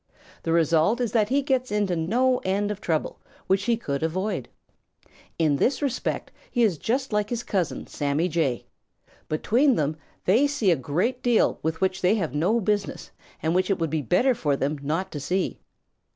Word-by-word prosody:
The 165 - -2
result 165 +6 +3
is 240 -3 -1
that 215 -3 +2
he 275 +2 +2
gets 260 -3 0
into 205 -4 +1
no 245 +10 +2
end 200 +2 -1
of 210 0 -6
trouble 160 -3 -1 0.3
which 195 +1 +1
he 235 -1 +2
could 140 -11 -3
avoid. 180 - -2 0.9
In 155 -4 +2
this 260 - +1
respect 275 -4 -2 0.2
he 240 - +1
is 185 -9 +2
just 260 +1 -1
like 210 0 +1
his 240 -1 -2
cousin, 185 -5 -2
Sammy 145 +4 -1
Jay. 155 -8 -1 0.6
Between 240 - +3
them 150 -2 0 0.3
they 235 +10 +4
see 260 -10 +1
a - - +4
great 180 - -1
deal 240 -3 +2
with 160 +2 -2
which 190 0 0
they 185 +4 +4
have 165 - -2
no 180 +10 +2
business 205 -1 -2 0.3
and 160 +1 +1
which 185 +2 +1
it 195 - +2
would 165 -3 -2
be 155 -1 0
better 180 - +3
for 150 -10 0
them 145 +2 -2
not 165 +7 -2
to 150 - -5
see. 185 +7 -1
190 Hz, 185 wpm, -25 LUFS, 160-230 Hz, 0.9 s, they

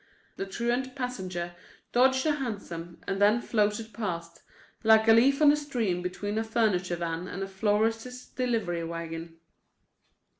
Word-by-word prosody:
The 195 - -3
truant 240 +5 -1
passenger 185 -10 -4 0.4
dodged 260 +2 +4
a 310 - +4
hansom 200 - -5
and 195 +1 -2
then 210 +3 +5
floated 215 -1 0
past, 170 -7 -4 0.4
like 220 0 +6
a 225 - +8
leaf 275 +6 +5
on 290 - +8
a - - +4
stream 240 -12 -1
between 205 +4 -3
a - - 0
furniture 210 -6 +1
van 170 +1 -3
and 195 +2 -4
a - - -4
florist's 225 +5 0
delivery 220 -9 -1
wagon. 165 0 -6
210 Hz, 145 wpm, -28 LUFS, 180-240 Hz, 0.4 s, a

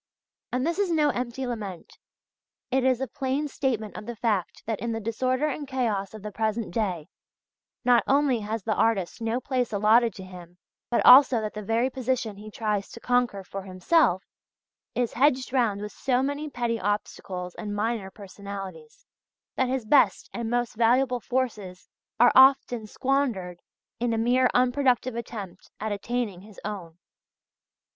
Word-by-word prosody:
And 255 +2 0
this 340 +4 -1
is 400 -3 +1
no 310 -3 +3
empty 250 +1 -3
lament; 210 -8 -6 0.7
it 265 0 +2
is 260 -1 +2
a 265 - -1
plain 275 +2 -2
statement 235 -7 -2
of 210 - -8
the 240 - -5
fact 215 -5 -1
that 225 -2 -2
in 230 +2 -2
the 225 - -2
disorder 255 +5 0
and 290 0 -4
chaos 220 -7 -2
of 215 - -10
the 210 - -5
present 220 -1 -2
day, 185 -8 -2 0.8
not 245 -1 +5
only 275 -3 +3
has 215 0 -4
the 220 - 0
artist 215 -2 0
no 225 +2 0
place 255 -2 -1
allotted 220 +2 +3
to 190 - -8
him, 180 -1 -12 0.3
but 240 - +1
also 255 -1 +9
that 215 -1 -4
the 215 - -5
very 225 +4 +1
position 250 -4 -2
he 215 +1 -9
tries 210 -2 -2
to - - -9
conquer 245 -5 0
for 195 +1 -7
himself, 190 - +2 0.7
is 245 -2 0
hedged 260 -1 +2
round 225 -6 +1
with 210 0 -5
so 255 -1 0
many 285 +2 -2
petty 235 -3 -2
obstacles 185 -3 -3
and 205 -2 -5
minor 215 -2 -1
personalities, 195 -5 -9 0.5
that 260 -1 +1
his 260 -3 -2
best 275 +5 +3
and 235 -2 -3
most 240 0 0
valuable 245 +3 +2
forces 215 -8 -3 0.3
are 245 - +7
often 260 -4 +5
squandered 230 -10 -1 0.4
in 240 -1 0
a - - 0
mere 250 +3 +3
unproductive 255 0 +2
attempt 215 -6 -7
at 215 +1 -3
"attaining 205 -2 -3
his 210 0 -14
own." 180 -6 -6
230 Hz, 165 wpm, -26 LUFS, 205-255 Hz, 0.8 s, also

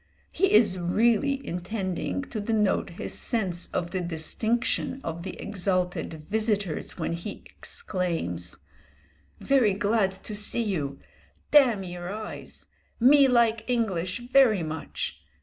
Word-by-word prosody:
He 390 +2 +2
is 210 -4 +5
really 235 +9 +2
intending 185 +6 -3
to 220 - -3
denote 210 -2 +1
his - - -3
sense 190 -8 -1
of 175 -1 -3
the 185 - -1
distinction 220 - -1
of 165 +1 -4
the 185 +1 -7
exalted 180 -5 -2
visitors, 205 -5 -1
when - - -2
he 175 +5 -6
exclaims: 165 - -3 0.8
"Very 245 -8 +3
glad 200 -1 +1
see 210 +4 +2
you! 150 -10 -2 0.5
Damn 250 -9 +5
your 175 0 -6
eyes! 215 +1 -7 0.3
Me 275 +3 +7
like 230 -2 +2
English 200 -4 -1
very 235 -10 +5
much. 155 0 -5
205 Hz, 115 wpm, -27 LUFS, 175-230 Hz, 0.8 s, Me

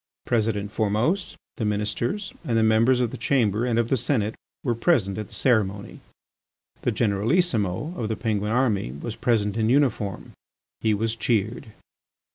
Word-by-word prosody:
President 105 -3 0
Formose, 110 - 0 0.2
the 120 - -2
Ministers, 105 - -2
and 115 -2 0
the 110 - +4
members 115 +3 +4
of 120 -2 0
the - - -6
Chamber 115 -4 +1
and 115 -2 +1
of 115 0 +1
the 135 - +2
Senate 110 -3 0 0.3
were 120 - +1
present 115 - +1
at 105 - -5
the - - -15
ceremony. 105 -5 0 0.8
The - - +1
Generalissimo 110 - +1
of 110 -7 -3
the 110 - 0
Penguin 105 -1 -1
army 110 - +1
was 105 +11 -6
present 105 -3 +1
in 110 0 +1
uniform. 125 -7 +1 0.5
He 110 -1 +2
was 110 +2 -1
cheered. 110 -1 -1
110 Hz, 155 wpm, -25 LUFS, 105-125 Hz, 0.8 s, the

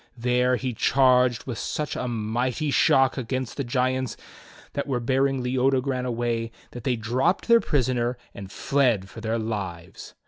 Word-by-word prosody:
There 125 +1 +2
he 130 0 -3
charged 125 0 +3
with 120 -4 -5
such 150 -1 -3
a 125 - -3
mighty 120 +5 -1
shock 135 -2 +4
against 130 0 -3
the 140 - -2
giants 130 0 -1 0.6
that 140 - -3
were 130 -3 0
bearing 135 +2 +1
Leodogran 130 0 0
away 115 -1 -2 0.2
that 120 - -9
they 125 - +2
dropped 120 - 0
their 235 0 +7
prisoner 125 -3 0 0.2
and 95 -1 -9
fled 120 -8 +1
for 110 +4 -10
their 110 0 -1
lives. 100 -5 -5
125 Hz, 150 wpm, -25 LUFS, 115-130 Hz, 0.6 s, their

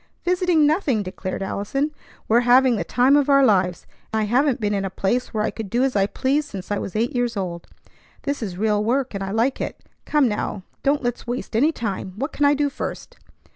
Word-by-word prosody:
"Visiting, 360 -3 +3
nothing!" 290 - +1
declared 185 +1 -5
Allison; 275 +10 -2 0.4
"we're 230 +2 +5
having 250 +1 +5
the 190 - -1
time 250 +9 +3
of 290 -1 +3
our 275 -1 +6
lives. 185 -6 +2 0.3
I 220 0 +1
haven't 255 +5 +2
been 210 -2 0
in 200 -1 -1
a 195 - -2
place 195 +6 -1
where 215 -2 -1
I - - 0
could 220 -3 -6
do 240 +4 +1
as 265 -3 0
I 195 -1 +3
pleased 285 +6 0
since 195 0 -7
I 205 - 0
was 190 - -6
eight 230 +4 0
years 240 -2 0
old. 175 -3 -4 0.6
This 285 -1 -2
is 190 -5 -4
real 210 0 +1
work, 255 +3 0
and 195 -1 -3
I 195 - -4
like 230 +6 0
it. - - -4 0.3
Come 295 -3 +3
now, 210 -2 -3 0.2
don't 280 0 +1
let's 240 0 -3
waste 245 -1 -4
any 285 +8 +4
time. 200 - -4
What 275 +8 -3
can 290 - +1
I 285 0 +5
do 290 0 +1
first? 280 - -6
240 Hz, 220 wpm, -22 LUFS, 205-275 Hz, 0.6 s, our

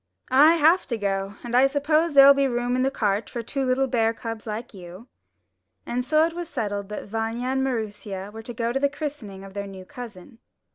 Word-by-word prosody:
"I 300 +5 +7
have 335 +3 +4
to 235 - -2
go, 195 -1 -2
and 240 -1 -6
I 260 +2 +6
suppose 300 +3 +1
there'll 275 0 +9
be 275 0 +2
room 245 0 -1
in 255 - +1
the 265 - +2
cart 210 -5 -1
for 235 - -5
two 270 +4 -3
little 260 +1 +2
bear 230 -3 +1
cubs 225 -1 -7
like 220 +2 -5
you." 185 +4 -11 0.8
And 250 +1 -2
so 310 +4 +3
it 330 - -3
was 345 -1 -6
settled 205 -6 -3
that 210 - -6
Vanya 225 +4 -3
and 265 0 0
Maroosia 210 -5 -4
were 225 - -7
to 240 +2 -8
go 235 +1 -1
to 270 - 0
the 280 +1 +2
christening 280 -10 -6
of 195 -1 -11
their 200 0 -5
new 190 -1 -10
cousin. 230 -3 -11
240 Hz, 220 wpm, -24 LUFS, 210-275 Hz, 0.8 s, there'll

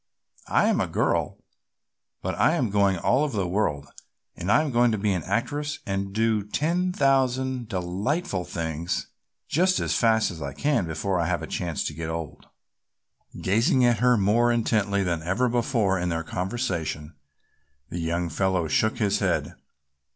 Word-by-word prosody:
"I - - +3
am - - +2
a - - 0
girl, - - 0 0.9
but - - -1
I - - +3
am 115 -5 0
going 100 -2 +3
all 130 - +2
over 140 -8 -2
the 95 -3 0
world 80 -7 -1 0.5
and 90 +4 -2
I 155 - +5
am 150 - -2
going 120 -1 +3
to 110 - 0
be 100 0 +1
an 90 - -1
actress 145 +5 -2
and 95 -2 -2
do 110 0 +1
ten 170 - 0
thousand 130 -4 +1
delightful 95 - -2
things 80 0 -3 0.4
just 185 +4 +2
as - - -1
fast 110 -1 +3
as 80 -3 -9
I 70 -1 -4
can 140 - +1
before 90 +4 -1
I 85 - 0
have 85 -3 -1
a - - -2
chance 85 -1 -3
to - - -3
get 80 +1 -5
old." 80 -2 -6 1.0
Gazing 120 - +3
at 120 -3 +3
her 125 0 +4
more 110 +4 +3
intently 105 -4 +1
than 85 -3 -1
ever 95 +10 0
before 115 -5 +1
in 90 0 -1
their 80 -1 -2
conversation, 90 - -3 0.8
the 85 - -5
young 85 +1 -1
fellow 90 0 0
shook 110 +9 +1
his 105 -4 +1
head. - - 0
100 Hz, 170 wpm, -25 LUFS, 90-120 Hz, 1.0 s, I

